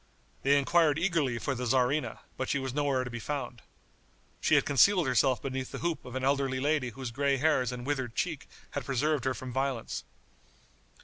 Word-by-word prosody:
They 140 Hz, +1 st, +4 dB
inquired 150 Hz, +1 st, +3 dB
eagerly 165 Hz, -8 st, +1 dB
for 135 Hz, +4 st, -2 dB
the 125 Hz, -1 st, -3 dB
tzarina, 130 Hz, +4 st, +1 dB
but 130 Hz, -, -3 dB
she -, -, +1 dB
was 130 Hz, -2 st, -3 dB
nowhere 140 Hz, -3 st, +1 dB
to 125 Hz, -, -6 dB
be 120 Hz, -, -5 dB
found. 135 Hz, -2 st, -4 dB, 0.8 s
She -, -, +3 dB
had -, -, +4 dB
concealed 175 Hz, -, +5 dB
herself 130 Hz, 0 st, +2 dB
beneath 130 Hz, -1 st, -4 dB
the -, -, -5 dB
hoop 170 Hz, -1 st, -2 dB
of 125 Hz, -, -8 dB
an 130 Hz, -, -2 dB
elderly 135 Hz, -1 st, +1 dB
lady 145 Hz, -2 st, +1 dB
whose 125 Hz, 0 st, -6 dB
gray 140 Hz, +2 st, +1 dB
hairs 130 Hz, -4 st, +2 dB
and 125 Hz, -1 st, -6 dB
withered 130 Hz, -5 st, -2 dB
cheek -, -, -2 dB, 0.2 s
had -, -, -3 dB
preserved 140 Hz, +1 st, 0 dB
her 130 Hz, -1 st, +1 dB
from 130 Hz, -2 st, -7 dB
violence. 130 Hz, -3 st, -2 dB
135 Hz, 190 wpm, -30 LUFS, 125-145 Hz, 0.8 s, concealed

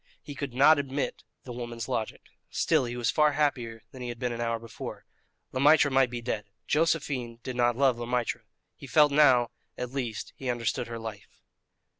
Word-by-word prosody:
He 145 Hz, -, -8 dB
could 135 Hz, -3 st, -5 dB
not 145 Hz, +3 st, +6 dB
admit 140 Hz, 0 st, -3 dB, 0.2 s
the 125 Hz, -, -8 dB
woman's 120 Hz, -2 st, -5 dB
logic. 110 Hz, -, -3 dB, 0.3 s
Still, -, -, +2 dB
he 120 Hz, 0 st, -5 dB
was 120 Hz, -, +1 dB
far 150 Hz, -1 st, +3 dB
happier 125 Hz, -7 st, -1 dB
than 130 Hz, -3 st, -10 dB
he 125 Hz, -, -4 dB
had 120 Hz, -, -5 dB
been 125 Hz, 0 st, -2 dB
an 120 Hz, 0 st, -4 dB
hour 115 Hz, 0 st, 0 dB
before. 115 Hz, 0 st, -8 dB, 0.5 s
Le 130 Hz, -, -3 dB
Maître 145 Hz, +1 st, +6 dB
might 130 Hz, -1 st, +4 dB
be 120 Hz, -1 st, -5 dB
dead. 110 Hz, -3 st, -2 dB, 0.2 s
Josephine 145 Hz, -7 st, 0 dB
did 130 Hz, -, -5 dB
not 120 Hz, -1 st, +2 dB
love 130 Hz, -3 st, +3 dB
Le 120 Hz, -, -4 dB
Maître. 125 Hz, -1 st, -1 dB, 0.3 s
He -, -, -11 dB
felt 150 Hz, +1 st, +5 dB
that 140 Hz, -, 0 dB
now, 130 Hz, -5 st, +5 dB, 0.3 s
at 125 Hz, -1 st, -4 dB
least, 120 Hz, -5 st, -4 dB
he 130 Hz, -, -5 dB
understood 120 Hz, -1 st, -1 dB
her 115 Hz, 0 st, -5 dB
life. 110 Hz, -3 st, -9 dB
125 Hz, 200 wpm, -28 LUFS, 120-140 Hz, 0.5 s, not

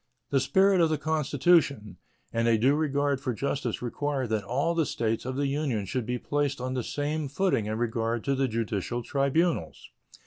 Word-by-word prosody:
The 135 Hz, -, +3 dB
spirit 190 Hz, +7 st, +3 dB
of 165 Hz, -, +4 dB
the 155 Hz, -, +1 dB
Constitution 145 Hz, -, +1 dB, 0.4 s
and 115 Hz, 0 st, +1 dB
a 115 Hz, -1 st, +4 dB
due 130 Hz, +6 st, +3 dB
regard 145 Hz, -2 st, 0 dB
to 125 Hz, -4 st, -2 dB
justice 135 Hz, -1 st, -2 dB
require 135 Hz, +2 st, -2 dB
that 110 Hz, -3 st, -1 dB
all 140 Hz, -, 0 dB
the 165 Hz, -4 st, +1 dB
States 115 Hz, 0 st, -1 dB
of 130 Hz, 0 st, -3 dB
the 140 Hz, +1 st, 0 dB
Union 135 Hz, -7 st, -1 dB
should 110 Hz, +5 st, -3 dB
be 125 Hz, 0 st, -1 dB
placed 145 Hz, +1 st, -1 dB
on 130 Hz, +1 st, -3 dB
the 130 Hz, -, -1 dB
same 150 Hz, +3 st, -2 dB
footing 140 Hz, -, 0 dB
in 110 Hz, +1 st, -2 dB
regard 115 Hz, 0 st, -1 dB
to 140 Hz, -, +1 dB
the 135 Hz, 0 st, +1 dB
judicial 115 Hz, 0 st, -2 dB
tribunals. 140 Hz, -, 0 dB
135 Hz, 185 wpm, -27 LUFS, 115-145 Hz, 0.4 s, of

